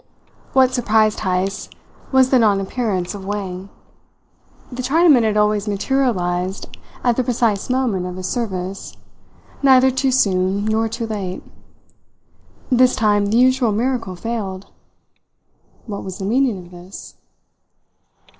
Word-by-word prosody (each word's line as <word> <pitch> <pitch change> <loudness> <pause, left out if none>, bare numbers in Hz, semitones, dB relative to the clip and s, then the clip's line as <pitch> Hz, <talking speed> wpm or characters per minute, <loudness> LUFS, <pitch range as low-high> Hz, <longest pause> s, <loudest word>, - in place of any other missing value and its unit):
What 260 -1 +4
surprised 220 -3 +2
Heyst 185 +1 -2 0.4
was 260 -1 +4
the 260 - +5
non 210 -4 +3
appearance 195 -3 -2
of 200 -2 -8
Wang. 195 -1 -5 1.0
The 250 +1 -5
Chinaman 295 0 +4
had 215 -2 +1
always 210 0 +1
materialized 195 -5 -1 0.3
at 240 -2 +2
the 255 - +2
precise 230 -4 0
moment 240 -8 0
of 180 - -6
his 185 0 -5
service, 190 -4 -4 0.6
neither 265 -1 +5
too 265 +1 0
soon 195 -4 +1
nor 220 +1 0
too 230 +1 -4
late. 200 -4 -5 1.3
This 255 0 +4
time 205 -2 +2
the 215 +3 +1
usual 255 -2 +3
miracle 230 -3 -1
failed. 195 -2 -5 1.1
What 205 -3 -6
was 190 -1 -7
the 190 - -5
meaning 245 0 +1
of 175 - -17
this? 180 +2 -11
215 Hz, 125 wpm, -19 LUFS, 190-250 Hz, 1.3 s, the